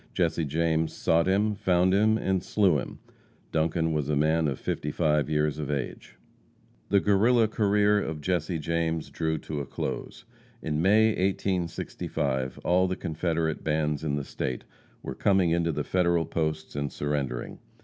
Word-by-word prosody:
Jesse 85 -2 +1
James 80 +2 0
sought 85 +2 +2
him, 105 +3 +2
found 95 -3 +2
him, 110 +2 +4
and 95 -4 0
slew 95 -8 +2
him. - - -7 0.5
Duncan 80 0 +1
was 75 -2 -1
a 75 - +1
man 80 +2 +2
of 70 -3 -2
55 75 0 0
years 75 0 0
of 75 -2 -4
age. 65 -3 -4 0.7
The 100 - +4
Guerrilla 110 +4 +3
career 105 -1 +2
of 80 -4 -4
Jesse 85 0 -1
James 80 0 -2
drew 80 -1 -1
to 75 0 -5
a 70 - -3
close. 120 - -5 0.3
In 75 -5 -2
May, 105 +4 +5
1865, 85 -8 -2
all 90 +1 +3
the 95 - -2
Confederate 80 -1 -2
bands 75 -1 0
in 75 -2 -1
the 70 - -2
State 65 -2 -4 0.4
were - - -4
coming 95 -4 +2
into 85 0 +1
the 75 -1 -2
Federal 85 -2 +1
posts 80 -2 -3
and 70 0 -2
surrendering. 70 -4 -3
80 Hz, 155 wpm, -27 LUFS, 75-95 Hz, 0.7 s, May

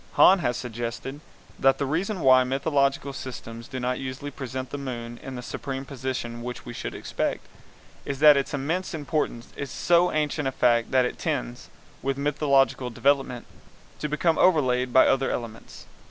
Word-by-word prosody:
Hahn 190 +1 +7
has 120 -7 0
suggested 120 +3 -5 0.4
that 135 0 +4
the 140 - -1
reason 180 +7 -1
why 130 -2 +6
mythological 140 +1 0
systems 115 -3 -8
do 130 - -5
not 125 0 -1
usually 135 +2 -5
present 130 -1 -6
the 145 - -4
moon 120 -3 -6
in 135 - -7
the 125 - -6
supreme 135 +1 -5
position 130 -3 -4
which 125 +1 -6
we 120 - -7
should - - -5
expect, - - -3 0.6
is 135 - -4
that 150 +1 +8
its 140 - 0
immense 160 +6 -2
importance 145 -5 -2
is 140 - -5
so 175 +8 +3
ancient 150 -1 0
a - - 0
fact 120 -3 +2
that 130 -1 +3
it - - -4
tends, - - -3 0.3
with 135 0 -1
mythological 140 -3 +2
development, 135 0 +1 0.5
to 150 - -3
become 160 +2 +1
overlaid 130 -8 +3
by 130 - +6
other 135 0 +2
elements. 115 -2 -6
135 Hz, 170 wpm, -26 LUFS, 125-145 Hz, 0.6 s, that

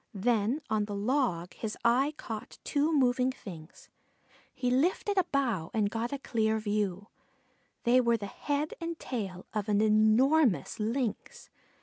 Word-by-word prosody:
Then 230 +6 +1
on 215 -1 0
the 205 -1 -5
log 200 -6 0
his 220 -1 -5
eye 265 +6 +3
caught 220 -2 -7
two 295 +2 +1
moving 255 -3 +3
things. 170 -9 -11 0.6
He 250 -1 -1
lifted 355 +9 +1
a 375 -3 +3
bough 235 - -1
and 205 -2 +1
got 230 +1 -2
a 280 - -2
clear 220 -4 0
view. 205 -3 -1 0.8
They 250 +2 +5
were 235 -1 +2
the 205 - -6
head 290 +9 -2
and 335 0 -3
tail 195 -11 -5
of 210 -1 -2
an 205 -1 +3
enormous 220 - +3
Lynx. 230 +1 -3
230 Hz, 145 wpm, -30 LUFS, 210-270 Hz, 0.8 s, They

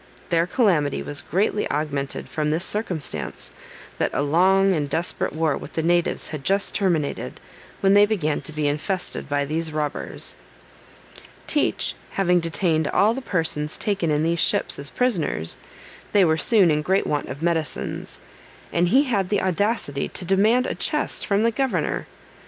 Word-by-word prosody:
Their 170 0 +2
calamity 180 - +2
was 145 0 -5
greatly 205 +4 0
augmented 145 -2 -2
from 150 -1 -1
this 160 +4 0
circumstance, 180 - -4 0.5
that - - +2
a 140 - +1
long 190 +6 +4
and 150 -4 -1
desperate 170 +4 -1
war 155 -1 0
with - - -8
the 160 - -1
natives 175 +1 +1
had 150 -3 -6
just 195 +4 +1
terminated, 160 - -1 0.4
when 195 0 +4
they 205 +1 +6
began 165 -9 0
to - - -7
be 155 -1 -1
infested 155 +6 -3
by 145 0 +1
these 160 +2 -2
robbers. 150 -1 -3 1.1
Teach 295 - +1 0.2
having 180 -2 +3
detained 165 -2 0
all 210 +8 +3
the 265 - -4
persons 160 - -1
taken 200 -6 -1
in 150 0 +1
these 170 +1 +1
ships - - +1
as 140 -1 -1
prisoners, 165 - 0 0.5
they 200 -3 +6
were 160 -1 +3
soon 190 0 +4
in 150 0 +1
great 190 +5 +1
want 145 -1 -1
of 140 +4 -6
medicines, 165 -4 -2 0.5
and 175 +1 +3
he 260 +10 +5
had 205 -9 0
the 205 -2 +1
audacity 190 -6 0
to 180 - -4
demand 215 +7 +3
a - - -1
chest - - -1
from 200 +1 +2
the 230 - +3
governor. 220 - -1
170 Hz, 165 wpm, -23 LUFS, 150-195 Hz, 1.1 s, they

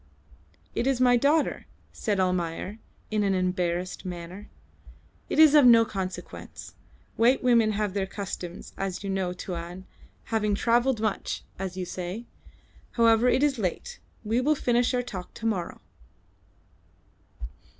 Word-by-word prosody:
"It 245 - -1
is 270 -2 +1
my 250 -1 +5
daughter," 285 +5 +1 0.3
said 205 -4 -1
Almayer, 180 +2 -1 0.3
in 215 -1 +1
an 195 -2 +2
embarrassed 180 -1 -1
manner. 180 +2 -7 0.8
"It - - -2
is 310 -2 +8
of 295 -2 +7
no 230 -1 +7
consequence. 190 -3 -7 0.4
White 245 +4 +3
women 230 -3 +4
have 210 -2 -1
their 195 -1 -1
customs, 185 -3 -7
as 195 0 -3
you 195 - -3
know 190 -2 -1
Tuan, 180 0 -6 0.4
having 215 -2 0
travelled 240 +2 +2
much, 215 -3 -2 0.2
as 190 -1 -4
you 185 - -3
say. 180 +6 -5 0.7
However, 230 0 +4
it 265 - +2
is 280 -4 +2
late; 220 - -3 0.2
we 225 +3 +1
will 300 +4 +2
finish 245 -3 +1
our 245 - 0
talk 185 -7 -8
to 225 - -7
morrow." 190 -6 -2
210 Hz, 140 wpm, -27 LUFS, 185-240 Hz, 0.8 s, is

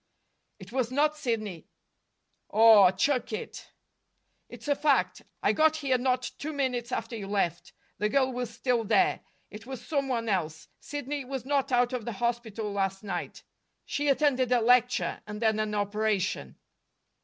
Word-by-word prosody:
"It 195 0 -12
was 255 -2 0
not 300 +4 +2
Sidney." 215 - -3 0.8
"Aw, 220 -4 +7
chuck 245 +8 0
it!" 215 - -6 0.8
"It's - - -11
a 285 - +3
fact. 290 -1 +1 0.2
I - - +3
got 315 0 +4
here 275 -5 0
not 255 0 0
two 310 +2 -4
minutes 255 -4 -2
after 240 - -3
you 205 -3 -6
left. 195 -4 -1 0.3
The 210 - +1
girl 260 +2 +2
was 245 -2 -3
still 235 0 0
there. 370 - +2 0.3
It 215 +3 -10
was 260 -2 -7
some 280 -3 -1
one 235 -3 -2
else. 160 -6 -2
Sidney 290 0 -5
was 260 -1 -5
not 275 0 0
out 245 0 +2
of 245 -4 -3
the 235 - -3
hospital 225 -1 -2
last 195 0 -1
night. 185 -4 -5 0.4
She 290 +1 -2
attended 270 -3 +2
a 250 - +5
lecture, 245 +2 +2
and 210 0 -6
then 220 -1 +1
an 215 -1 -1
operation." 205 - -1
240 Hz, 160 wpm, -28 LUFS, 210-270 Hz, 0.8 s, Aw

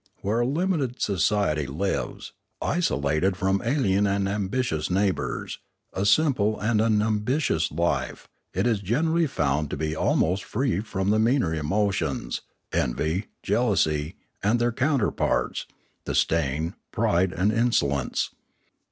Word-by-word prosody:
Where 105 +4 0
a 120 - +2
limited 150 -4 -1
society 90 -5 +1
lives, 85 +9 -3 0.3
isolated 90 - 0
from 95 +1 +1
alien 105 -6 +2
and 100 0 0
ambitious 100 -3 -1
neighbours, 95 +1 -1 0.3
a 95 +2 0
simple 110 -5 +3
and 110 0 +1
un 110 -2 +3
ambitious 110 - 0
life, 75 -4 -1 0.2
it 95 +3 -1
is 115 -4 +2
generally 160 - +1
found 75 - 0
to - - -4
be 80 +1 -2
almost 90 +4 +1
free 125 -5 -1
from 100 -2 -1
the 110 - +3
meaner 115 -6 +2
emotions, 80 -1 -1 0.3
envy, 80 - 0 0.2
jealousy, 80 -9 +1 0.3
and 105 +4 +2
their 120 0 +1
counterparts, 130 0 0 0.4
disdain, 80 +1 0 0.2
pride, 90 +2 +2
and 95 +3 +1
insolence. 70 - +1
100 Hz, 120 wpm, -25 LUFS, 80-115 Hz, 0.4 s, simple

